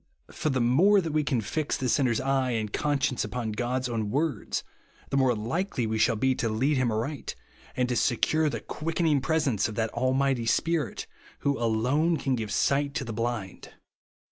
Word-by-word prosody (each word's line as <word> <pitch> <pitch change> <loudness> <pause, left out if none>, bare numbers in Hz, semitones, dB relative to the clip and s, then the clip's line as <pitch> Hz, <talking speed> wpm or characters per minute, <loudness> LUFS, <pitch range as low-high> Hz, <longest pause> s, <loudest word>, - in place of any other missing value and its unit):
For 155 - -2
the 130 -2 0
more 160 +13 +5
that 165 -4 -2
we 155 -1 +2
can 130 -5 0
fix 150 +7 -2
the 130 - -2
sinner's 125 -3 +2
eye 135 0 +1
and 110 -2 -2
conscience 145 -3 0
upon 120 -3 -3
God's 125 +4 -1
own 110 -3 -2
words, 140 -1 -1 0.5
the 135 - +1
more 130 -3 +3
likely 120 - -2
shall 115 +1 +3
we - - -6
be 130 -1 +3
to 115 - 0
lead 130 +7 +1
him 125 -3 +1
aright, 120 +7 -3 0.4
and 125 -1 +2
to 125 - -1
secure 155 +6 +2
the - - -4
quicken 165 +2 -3
ing 150 -4 +3
presence 140 -10 +1
of 110 - -7
that 110 0 -1
Almighty 130 -1 +1
Spirit 165 +6 0 0.4
who 140 0 +1
alone 125 +9 +1
can 135 -3 -1
give 110 -4 -2
sight 140 0 +1
to 135 - -2
the 115 - -5
blind. 115 -4 -4
130 Hz, 190 wpm, -27 LUFS, 115-145 Hz, 0.5 s, more